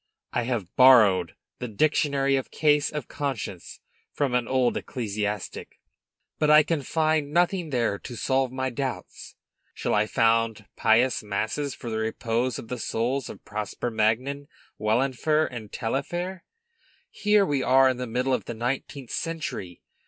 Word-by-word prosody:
I 120 - 0
have 115 -8 -3
borrowed 105 -10 +6 0.2
the 125 - -4
'Dictionary 140 +3 +1
of 135 - -2
Cases 150 -2 +2
of 150 -1 -5
Conscience' 125 -10 -5 0.3
from 140 -4 -1
an 125 -2 +1
old 130 -2 +2
ecclesiastic, 105 -4 -4 0.6
but 150 - +2
I 150 0 +8
can 160 -1 -1
find 155 0 0
nothing 175 +1 +1
there 115 -6 0
to 120 - -8
solve 130 +1 0
my 130 0 -2
doubts. 130 -1 -5 0.4
Shall - - -1
I 105 +1 +2
found 115 -1 +1
pious 115 +3 +3
masses 110 +7 -2
for 120 - -7
the 110 - -1
repose 115 +2 -1
of - - -8
the 125 +1 -5
souls 120 +4 -1
of - - -11
Prosper 105 +3 -4
Magnan, 125 +6 0 0.3
Wahlenfer, 135 +7 +1
and 110 -6 -8
Taillefer? 175 +10 -3 0.7
Here 210 -1 +3
we 145 -6 0
are 130 +1 +5
in 130 - -1
the 125 0 -4
middle 125 +3 0
of - - -1
the 120 - -5
nineteenth 125 +2 -4
century! 140 - -4
125 Hz, 150 wpm, -26 LUFS, 110-140 Hz, 0.7 s, I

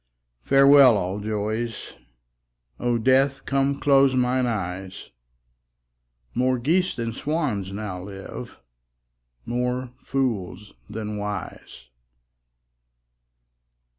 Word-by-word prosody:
Farewell, 135 - +6
all 95 +1 -2
joys; 110 +2 -3 0.9
O 120 -1 +1
Death, 135 +3 +2
come 140 0 0
close 135 -2 +4
mine 125 0 +1
eyes; 95 -3 -5 1.2
More 130 +1 +1
geese 170 +9 +1
than 115 -1 -3
swans 130 - -2
now 100 -3 -5
live, 95 0 -9 0.8
more 125 +1 -2
fools 105 -7 -3 0.2
than 105 -1 -5
wise. 105 -8 -6
120 Hz, 80 wpm, -24 LUFS, 105-135 Hz, 1.2 s, Farewell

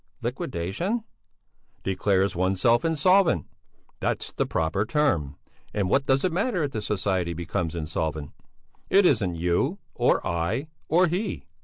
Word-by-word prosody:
"Liquidation?" 170 - -2 0.8
"Declares 95 0 +1
oneself 95 - +3
insolvent! 165 - +3 0.5
That's - - -2
the - - -1
proper 80 +5 0
term. 105 - 0 0.4
And 100 -2 0
what 135 0 +2
does 135 0 +3
it 185 - +1
matter 185 0 0
if 145 - -2
the 110 - -3
society 95 -4 -1
becomes 85 0 -3
insolvent? 80 -2 -3 0.6
It 195 0 +5
isn't 105 - +2
you, 90 - 0 0.2
or 120 - +2
I, 95 - -1 0.2
or 175 +4 +4
he! 180 - -2
100 Hz, 130 wpm, -26 LUFS, -, 0.8 s, It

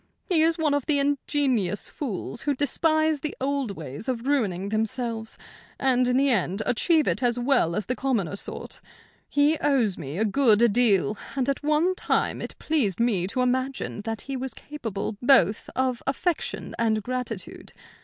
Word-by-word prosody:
He 350 -6 +2
is 325 +1 +3
one 310 -3 +1
of 285 -2 -1
the 300 -2 +3
ingenious 275 - 0
fools 235 -3 -5
who 290 -1 0
despise 310 +2 +2
the 300 +2 -5
old 270 -6 -2
ways 150 - -6
of 245 -1 -2
ruining 200 -9 0
themselves, 225 +1 -2 0.4
and 255 -2 +3
in 250 0 +2
the 275 0 +3
end 200 -1 0
achieve 310 +6 +2
it - - 0
as 245 -1 +1
well 245 -10 +2
as 210 - -2
the 250 - -2
commoner 230 -10 -1
sort. - - -5 0.5
He 290 +2 +3
owes 250 -11 +1
me 145 0 -6
a 220 - +2
good 230 -1 +4
deal, 210 -3 +3 0.2
and 265 -2 0
at 275 - -1
one 305 +5 +2
time - - 0
it - - -6
pleased 245 - 0
me 210 -7 +1
to 250 +6 -2
imagine 255 -2 -1
that 225 0 -4
he 275 - -5
was 260 -2 -4
capable 220 -8 -5
both 230 -6 +4
of 255 -2 0
affection 315 +5 -2
and 220 -2 +1
gratitude. 250 +2 -4
250 Hz, 170 wpm, -25 LUFS, 215-280 Hz, 0.5 s, good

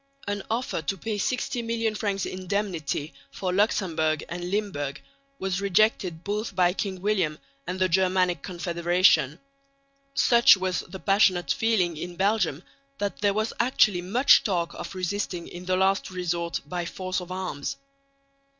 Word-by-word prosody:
An 205 0 -2
offer 230 -6 -1
to 160 +6 -2
pay 215 +2 -3
sixty 245 +2 -1
million 230 -1 -1
francs 200 -2 -1
indemnity 185 -5 -3 0.2
for 185 -2 -3
Luxemburg 165 -6 +1
and 175 +1 -4
Limburg 180 -9 -2 0.4
was 190 -3 -2
rejected 195 -4 +2
both 205 0 -3
by 180 -1 +3
King 190 -2 -4
William 185 -8 +1 0.3
and 180 +1 -3
the 185 - +3
Germanic 185 -2 +2
Confederation. 175 -3 +2 0.8
Such 235 -4 +6
was 185 -1 -1
the 190 - -8
passionate 190 -3 +3
feeling 195 -8 +1
in 175 +2 -6
Belgium 190 -5 +1 0.3
that 205 -5 -3
there 200 -1 +2
was 220 +1 0
actually 215 -6 +3
much 230 +10 +5
talk 175 -5 -1
of - - -7
resisting 185 -1 -3
in 180 +1 -9
the 185 0 +1
last 190 +1 +2
resort 175 -2 -2
by 175 +4 -3
force 185 +2 -3
of 180 0 -9
arms. 185 - -4
185 Hz, 145 wpm, -26 LUFS, 175-205 Hz, 0.8 s, Such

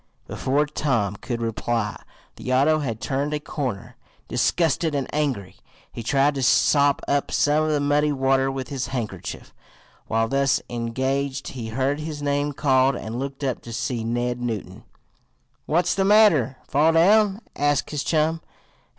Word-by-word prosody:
Before 145 +3 0
Tom 120 -9 -1
could 120 +1 -4
reply 115 -1 -2 0.4
the 130 - -5
auto 145 +5 +3
had 115 -7 -3
turned 140 +4 -1
a - - -2
corner. 130 -9 -5 0.3
Disgusted 165 -1 +1
and 135 -2 -1
angry, 135 -11 -2 0.3
he 120 - -7
tried 140 +5 +2
to 135 - -3
sop 140 +2 +3
up 140 0 0
some 150 +1 +2
of - - 0
the 150 -1 +1
muddy 145 +1 +2
water 135 -1 +2
with 135 -1 -5
his 135 -3 -3
handkerchief. 110 -8 -5 0.5
While 115 0 +1
thus 135 +1 +2
engaged 130 +4 -2
he 120 -4 -6
heard 135 +5 -1
his 150 -1 -5
name 145 0 0
called, 135 -1 +3
and 115 +1 -5
looked 135 +1 -5
up 130 -3 -2
to 120 - -10
see 115 0 -2
Ned 120 +1 -2
Newton. 115 -4 -5 0.8
"What's 175 +3 +2
the 195 - +1
matter? 190 - +4
Fall 155 +3 +3
down?" 200 +5 +4
asked 145 -1 0
his 150 -2 -2
chum. 160 +1 +1
135 Hz, 155 wpm, -23 LUFS, 120-150 Hz, 0.8 s, matter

